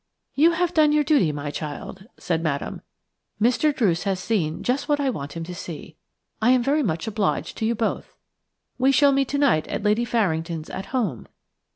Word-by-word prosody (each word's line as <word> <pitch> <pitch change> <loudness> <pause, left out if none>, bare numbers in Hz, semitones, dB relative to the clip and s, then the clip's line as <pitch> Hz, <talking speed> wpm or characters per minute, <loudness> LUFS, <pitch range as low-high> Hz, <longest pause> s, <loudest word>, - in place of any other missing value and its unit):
"You 325 +4 +4
have 350 +1 0
done 305 -2 +4
your 300 0 +3
duty, 285 - +3
my 145 0 -5
child," 155 +6 -7
said 165 -2 -1
Madame. 145 -4 -3 0.6
"Mr. 245 +7 +3
Druce 195 -11 +1
has 195 -2 -1
seen 185 -7 -1
just 260 +5 -1
what 290 0 +2
I 275 -2 +1
want 145 - -6
him 165 - -5
to 180 +2 -7
see. 165 -3 -8 0.5
I 225 - +4
am 255 -1 +4
very 290 +4 +2
much 165 - -1
obliged 215 -2 -1
to 220 - 0
you 235 - +1
both. 225 0 -3 0.6
We 265 +2 +4
shall 280 +1 +5
meet 275 -1 +2
tonight 280 - +2
at - - -4
Lady 210 +3 +2
Farringdon's 165 -8 -1
'At 190 - -6
Home'. 210 - -2
220 Hz, 190 wpm, -24 LUFS, 165-275 Hz, 0.6 s, shall